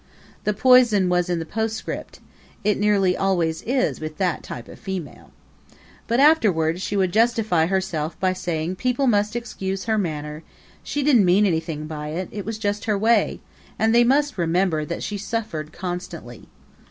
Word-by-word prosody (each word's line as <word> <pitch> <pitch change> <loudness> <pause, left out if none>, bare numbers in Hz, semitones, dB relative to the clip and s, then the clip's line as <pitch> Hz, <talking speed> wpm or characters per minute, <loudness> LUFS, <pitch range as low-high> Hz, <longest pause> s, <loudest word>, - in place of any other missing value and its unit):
The 210 - +2
poison 240 -6 +5
was 180 0 +1
in 175 - 0
the 165 - -4
postscript 220 +4 -4 0.4
it 210 0 +1
nearly 200 -3 +3
always 175 -4 0
is 255 +1 0
with 155 0 -6
that 185 -3 0
type 120 - -8
of - - -12
female. 190 -7 -6 0.8
But 235 +2 +1
afterward 190 - +3
she 200 - -2
would 185 -2 +1
justify 220 -7 +2
herself 175 -4 -2
by 185 -1 +1
saying 175 -1 -3
people 255 +4 0
must 210 -2 +2
excuse 195 -5 -4
her 220 -2 0
manner 150 -4 -4 0.4
she 290 - -3
didn't 265 -7 +5
mean 185 +4 +4
anything 160 -4 -1
by 150 -1 -6
it; 170 +5 -4
it 205 -2 -6
was 220 0 -4
just 205 -1 -2
her 210 -2 +1
way, 225 +3 +2 0.4
and 225 +1 +2
they 240 +1 +6
must 280 -2 +2
remember 170 -2 +1
that 170 - -5
she 205 -1 -4
suffered 200 -7 -4
constantly. 175 - -7
190 Hz, 165 wpm, -23 LUFS, 165-220 Hz, 0.8 s, they